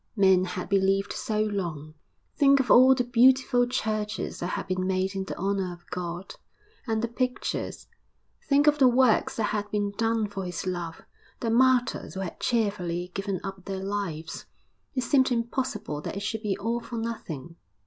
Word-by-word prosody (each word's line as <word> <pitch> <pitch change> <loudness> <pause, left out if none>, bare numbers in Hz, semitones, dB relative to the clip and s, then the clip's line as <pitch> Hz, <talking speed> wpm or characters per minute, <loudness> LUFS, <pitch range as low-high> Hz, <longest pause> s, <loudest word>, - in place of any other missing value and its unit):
Men 190 -3 +5
had 180 0 -5
believed 195 0 +2
so 215 -1 -1
long. 170 -8 -3 0.4
Think 275 -1 +5
of 255 -4 +1
all 260 +2 +8
the 250 - +1
beautiful 245 0 +4
churches 215 -3 -2
that 175 - -2
had - - -3
been 185 0 -1
made 190 0 0
in 195 -1 -3
the - - -6
honour 195 -1 -1
of 175 0 -16
God, 175 +1 -5 0.5
and 220 0 0
the - - +1
pictures. 250 +2 -3 0.6
Think 285 +1 +4
of 300 0 +4
the 265 - +7
works 250 -2 +3
that 225 - -1
had 210 -1 -2
been 205 -1 -1
done 225 +1 0
for 200 -1 -5
his 180 0 -4
love, 175 0 -4 0.4
the 230 - -1
martyrs 250 -2 +2
who 190 - -3
had 185 - -6
cheerfully 185 -6 -1
given 195 -2 -2
up 195 -2 -7
their 190 -1 -4
lives. 195 -6 -4 0.5
It 255 - +1
seemed 260 0 +3
impossible 230 - -2
that - - -5
it - - -4
should 210 +1 -3
be 200 -3 -1
all 230 +4 -1
for 235 0 -7
nothing. 170 - -5
205 Hz, 180 wpm, -27 LUFS, 185-235 Hz, 0.6 s, all